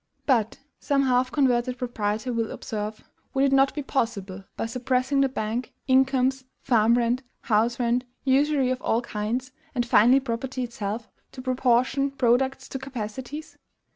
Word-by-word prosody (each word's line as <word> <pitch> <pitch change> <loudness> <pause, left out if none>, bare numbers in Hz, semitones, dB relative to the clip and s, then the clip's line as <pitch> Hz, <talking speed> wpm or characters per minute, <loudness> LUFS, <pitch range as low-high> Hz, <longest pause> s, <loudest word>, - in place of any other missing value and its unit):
But, 230 -6 +2 0.2
some 275 -1 +1
half 255 -1 +2
converted 250 -3 +1
proprietor 225 -1 -2
will 230 -1 -1
observe, 215 0 -5 0.3
"Would 270 - +3
it 275 - +2
not 270 0 +4
be 295 - -3
possible, 200 -8 -2
by - - -1
suppressing 255 +3 0
the 275 - +3
bank, 235 0 -3
incomes, 265 0 +3 0.2
farm 230 -2 +3
rent, 240 +1 +1 0.2
house 230 +1 +1
rent, 245 +1 +1 0.2
usury 275 0 +3
of 255 0 -2
all 230 +2 +1
kinds, 240 +4 -3 0.2
and 240 -1 +1
finally 240 +3 +5
property 255 0 -3
itself, 220 -1 -4 0.3
to 255 - -8
proportion 255 +2 +2
products 265 0 +1
to 270 - -4
capacities? 260 +3 -7
250 Hz, 145 wpm, -25 LUFS, 230-265 Hz, 0.3 s, finally